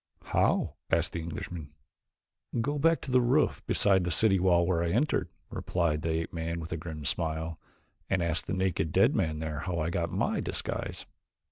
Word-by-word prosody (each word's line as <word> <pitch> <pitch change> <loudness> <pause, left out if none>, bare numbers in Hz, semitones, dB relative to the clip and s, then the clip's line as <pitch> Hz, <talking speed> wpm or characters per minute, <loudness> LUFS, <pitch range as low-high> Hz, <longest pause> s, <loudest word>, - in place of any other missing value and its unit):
"How?" - - +1
asked - - +2
the 85 - -2
Englishman. 80 -2 -6 0.9
"Go 145 +5 -1
back 165 +2 +3
to 135 - -5
the 125 0 +5
roof 130 +5 +2
beside 95 -2 +4
the 90 - -1
city 95 +3 +4
wall 90 -1 +4
where 85 -2 +1
I 85 - 0
entered," 125 - +1 0.2
replied 85 -4 0
the 80 - -2
ape 80 - -7
man 85 0 -3
with 80 -1 -7
a - - 0
grim 80 -2 -7
smile, 80 +2 -1 0.5
"and 95 -3 +1
ask 85 0 0
the - - -2
naked 95 -4 0
dead - - +4
man 80 -1 0
there 75 -1 -4
how 90 +1 -3
I 80 +1 -1
got - - -1
my - - 0
disguise." - - -3
85 Hz, 190 wpm, -29 LUFS, 80-95 Hz, 0.9 s, the